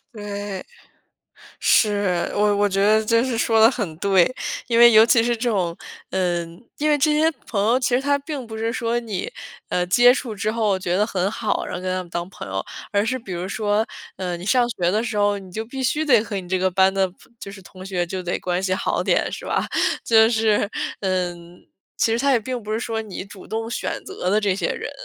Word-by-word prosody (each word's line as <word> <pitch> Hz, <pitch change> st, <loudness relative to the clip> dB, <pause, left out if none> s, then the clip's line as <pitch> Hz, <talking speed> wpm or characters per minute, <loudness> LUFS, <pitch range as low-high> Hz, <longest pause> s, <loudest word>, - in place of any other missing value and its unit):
对， 205 Hz, -2 st, -5 dB, 1.0 s
是， 200 Hz, -5 st, +2 dB
我 205 Hz, 0 st, +2 dB
我 205 Hz, 0 st, +2 dB
觉 195 Hz, 0 st, -1 dB
得 215 Hz, +1 st, +4 dB
真 230 Hz, +2 st, +3 dB
是 250 Hz, -3 st, -2 dB
说 225 Hz, -1 st, +3 dB
的 225 Hz, +1 st, +7 dB
很 205 Hz, -11 st, -4 dB
对。 195 Hz, +4 st, +3 dB, 0.3 s
因 235 Hz, -1 st, +2 dB
为 240 Hz, 0 st, +9 dB
尤 220 Hz, 0 st, +7 dB
其 230 Hz, -1 st, +4 dB
是 240 Hz, 0 st, 0 dB
这 240 Hz, +2 st, -1 dB
种 180 Hz, -6 st, -1 dB, 0.3 s
嗯， 175 Hz, -2 st, -2 dB, 0.2 s
因 300 Hz, +1 st, +1 dB
为 295 Hz, -, +3 dB
这 300 Hz, +2 st, +3 dB
些 310 Hz, +2 st, +3 dB, 0.2 s
朋 200 Hz, -3 st, -1 dB
友 235 Hz, +4 st, +3 dB
其 260 Hz, -, 0 dB
实 255 Hz, -, +2 dB
他 285 Hz, 0 st, +2 dB
并 285 Hz, -2 st, -6 dB
不 220 Hz, -1 st, -8 dB
是 225 Hz, +1 st, -1 dB
说 235 Hz, -1 st, -1 dB
你， 220 Hz, -6 st, -4 dB, 0.4 s
呃， 180 Hz, 0 st, 0 dB
接 245 Hz, +7 st, +6 dB
触 250 Hz, -3 st, -4 dB
之 210 Hz, +1 st, -1 dB
后 215 Hz, -3 st, +1 dB
觉 180 Hz, -1 st, -1 dB
得 210 Hz, +2 st, +2 dB
很 190 Hz, -2 st, -1 dB
好， 220 Hz, 0 st, -2 dB
然 -, -, -6 dB
后 -, -, -6 dB
跟 185 Hz, -, -4 dB
他 185 Hz, -, -2 dB
们 175 Hz, -, -15 dB
当 175 Hz, +1 st, -4 dB
朋 105 Hz, -, -9 dB
友。 95 Hz, 0 st, -2 dB, 0.3 s
而 205 Hz, 0 st, +1 dB
是 255 Hz, +3 st, 0 dB
比 225 Hz, -7 st, -8 dB
如 175 Hz, +1 st, -4 dB
说， 210 Hz, +1 st, 0 dB, 0.3 s
呃， 180 Hz, -2 st, -3 dB
你 175 Hz, -, -9 dB
上 240 Hz, +4 st, +3 dB
学 175 Hz, -6 st, 0 dB
的 215 Hz, +4 st, 0 dB
时 225 Hz, -, -3 dB
候， 205 Hz, 0 st, +2 dB
你 190 Hz, -2 st, -12 dB
就 220 Hz, +4 st, -4 dB
必 265 Hz, +4 st, -7 dB
须 300 Hz, +5 st, +1 dB
得 250 Hz, -7 st, +5 dB
和 220 Hz, -1 st, -6 dB
你 180 Hz, -, -12 dB
这 185 Hz, +1 st, 0 dB
个 185 Hz, +1 st, +2 dB
班 190 Hz, +1 st, +3 dB
的 195 Hz, 0 st, +2 dB
朋 190 Hz, -, -23 dB
就 195 Hz, -, -8 dB
是 195 Hz, -1 st, -12 dB
同 185 Hz, +1 st, -12 dB
学 180 Hz, -2 st, -1 dB
就 185 Hz, +2 st, -5 dB
得 180 Hz, -1 st, -2 dB
关 180 Hz, 0 st, -1 dB
系 185 Hz, -1 st, 0 dB
好 -, -, -1 dB
点， -, -, +1 dB
是 -, -, -7 dB
吧？ -, -, 0 dB, 0.4 s
就 220 Hz, -1 st, +5 dB
是， 220 Hz, -3 st, +2 dB, 0.3 s
嗯， 180 Hz, -2 st, -3 dB, 0.3 s
其 225 Hz, -, +2 dB
实 230 Hz, -, +1 dB
它 275 Hz, +2 st, +2 dB
也 245 Hz, -, +3 dB
并 250 Hz, +3 st, -4 dB
不 215 Hz, -1 st, -6 dB
是 220 Hz, -, -1 dB
说 225 Hz, -2 st, -2 dB
你 205 Hz, -4 st, -7 dB
主 195 Hz, -1 st, -13 dB
动 225 Hz, +1 st, -4 dB
选 -, -, -3 dB
择 395 Hz, -, -4 dB
的 210 Hz, +3 st, +3 dB
这 205 Hz, -2 st, +1 dB
些 190 Hz, -, -1 dB
人， -, -, -5 dB
210 Hz, 255 characters per minute, -22 LUFS, 185-230 Hz, 1.0 s, 为